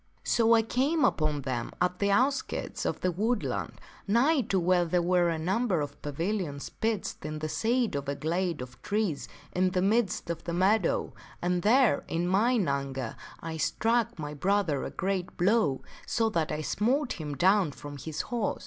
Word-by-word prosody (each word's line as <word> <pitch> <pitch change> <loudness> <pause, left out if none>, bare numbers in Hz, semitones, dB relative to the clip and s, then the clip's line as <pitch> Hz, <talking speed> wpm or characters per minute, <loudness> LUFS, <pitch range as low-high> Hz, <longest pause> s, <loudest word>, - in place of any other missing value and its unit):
" - - -38
So 230 -1 +5
I 225 - +4
came 270 +6 +1
upon 150 -2 +1
them 125 -3 -3
at 180 0 0
the 200 - +2
outskirts 260 +7 0
of - - -2
the 185 - +1
woodland, 215 +6 -2 0.3
nigh 265 +8 +4
to 190 - +2
where 180 0 +3
there 175 +1 +1
were 175 0 +3
a 165 - -1
number 190 +3 0
of 145 -1 -5
pavilions 160 0 -3
pitched 220 -2 -2
in 155 0 -4
the 155 0 -3
shade 235 +6 0
of 140 -1 -3
a 140 - -1
glade 170 +1 -1
of 125 -1 -13
trees 205 -8 -1 0.2
in 185 +1 +2
the 180 0 0
midst 200 -4 +1
of 170 - -6
the 170 - -3
meadow, 190 +2 +2 0.3
and 175 0 0
there, 225 - +4
in 170 +2 -1
mine 210 +2 +2
anger, 135 -3 -2 0.3
I 160 0 -5
struck 230 +6 +1
my 150 -2 -5
brother 175 -2 +1
a - - -3
great 190 -1 -3
blow 180 - +2 0.2
so 225 -1 +1
that 160 -5 0
I 155 0 -2
smote 245 - 0
him 150 -2 -4
down 185 0 +4
from 145 +1 -9
his 150 +3 -4
horse. 235 -3 -2
180 Hz, 185 wpm, -29 LUFS, 155-220 Hz, 0.3 s, So